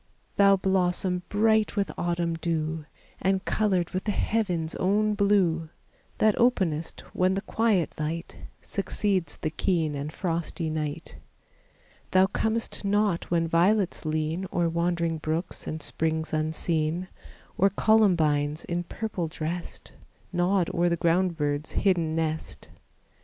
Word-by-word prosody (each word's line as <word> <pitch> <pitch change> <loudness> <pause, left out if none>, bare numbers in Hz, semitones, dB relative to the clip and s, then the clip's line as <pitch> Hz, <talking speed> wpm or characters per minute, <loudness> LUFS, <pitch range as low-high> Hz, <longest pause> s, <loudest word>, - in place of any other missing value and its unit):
Thou 200 -1 +6
blossom 185 -1 +1
bright 220 +1 +2
with 200 -6 0
autumn 170 -1 -1
dew, 160 -1 -2 0.4
And 190 0 +1
colored 190 -5 +1
with 185 0 -3
the 210 - +1
heaven's 180 -7 -1
own 210 +3 +2
blue, 190 -6 +2 0.5
That 215 -1 +4
openest 180 -10 +1
when 185 +1 +2
the 195 - -1
quiet 215 -7 +1
light 160 +3 -3 0.3
Succeeds 195 -2 -1
the 155 - -3
keen 160 -2 0
and 145 +1 -4
frosty 165 -1 -2
night. 155 +1 -4 0.9
Thou 185 0 +5
comest 220 +3 -1
not 205 -3 +1
when 165 -1 +1
violets 180 +4 +2
lean 155 +4 -1
O'er 170 -1 +1
wandering 170 -1 0
brooks 160 +3 -3
and 155 -1 -4
springs 160 +1 -1
unseen, 155 +2 -1 0.5
Or 195 - +4
columbines 165 -9 +2
in 175 0 -1
purple 200 -4 -3
dressed, 165 +2 -5 0.4
Nod 180 0 +2
o'er 175 +1 +2
the 170 - 0
ground 170 +1 +2
bird's 145 0 -1
hidden 170 -5 +1
nest. 160 -1 -3
175 Hz, 125 wpm, -27 LUFS, 160-195 Hz, 0.9 s, Thou